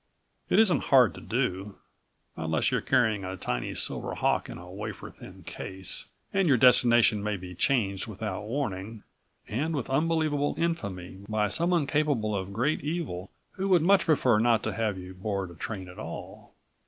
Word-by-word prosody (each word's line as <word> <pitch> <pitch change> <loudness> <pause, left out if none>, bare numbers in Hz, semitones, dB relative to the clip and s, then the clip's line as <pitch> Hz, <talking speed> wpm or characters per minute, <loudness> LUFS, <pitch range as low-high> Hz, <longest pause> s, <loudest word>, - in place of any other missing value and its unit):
It - - +3
isn't 190 -9 +4
hard 130 -5 +5
to - - -10
do, 105 -4 -2 0.6
unless 80 -1 0
you're - - +1
carrying 110 -3 +2
a 95 +1 -5
tiny 60 -7 -2
silver - - -3
hawk - - +1
in - - -7
a 90 +1 -11
wafer 105 +3 -7
thin - - -13
case, 95 -1 -5 0.3
and 195 -2 +2
your 135 -4 +5
destination 120 -3 +5
may 105 0 -1
be 90 0 -9
changed 100 -1 0
without 105 -2 -5
warning 110 -4 -4 0.4
and 155 +9 -1
with 130 -2 -3
unbelievable 155 0 +1
infamy 100 - -3
by 105 -1 +1
someone 170 - +2
capable 135 -8 +1
of 95 0 -3
great 130 +10 0
evil 145 - -3 0.2
who 195 +1 -3
would 180 -4 +5
much 195 +2 +4
prefer 130 -8 +3
not 115 -1 +3
to - - -1
have 110 -4 -1
you 90 0 -8
board 95 -1 -3
a - - -11
train 95 +2 -6
at 90 - -11
all. - - -8
110 Hz, 170 wpm, -28 LUFS, 95-145 Hz, 0.6 s, hard